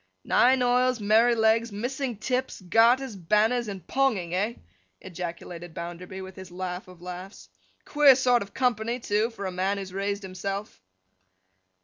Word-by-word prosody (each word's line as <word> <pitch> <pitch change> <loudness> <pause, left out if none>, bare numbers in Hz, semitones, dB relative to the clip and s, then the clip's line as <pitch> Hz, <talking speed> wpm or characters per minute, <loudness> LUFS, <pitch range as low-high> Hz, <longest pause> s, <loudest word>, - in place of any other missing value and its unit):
'Nine 255 +1 +4
oils, 250 0 +2
Merrylegs, 225 +1 +3
missing 245 +3 -3
tips, 255 +4 -2
garters, 230 +6 +3
banners, 215 +6 +1
and 195 -5 -7
Ponging, 220 -11 0
eh!' 210 +6 0 0.4
ejaculated 175 -1 -7
Bounderby, 175 +2 -7
with 190 0 -10
his 190 -1 -10
laugh 180 +1 -5
of 180 -1 -15
laughs. 180 - -9 0.4
'Queer 290 -3 +6
sort 250 -2 +3
of 200 0 -7
company, 240 -1 0
too, 215 0 0
for 200 -4 -7
a 190 - -2
man 190 +2 -1
who - - -4
has 190 -1 -8
raised 200 +1 -2
himself! 195 - -5
205 Hz, 145 wpm, -26 LUFS, 185-240 Hz, 0.4 s, Queer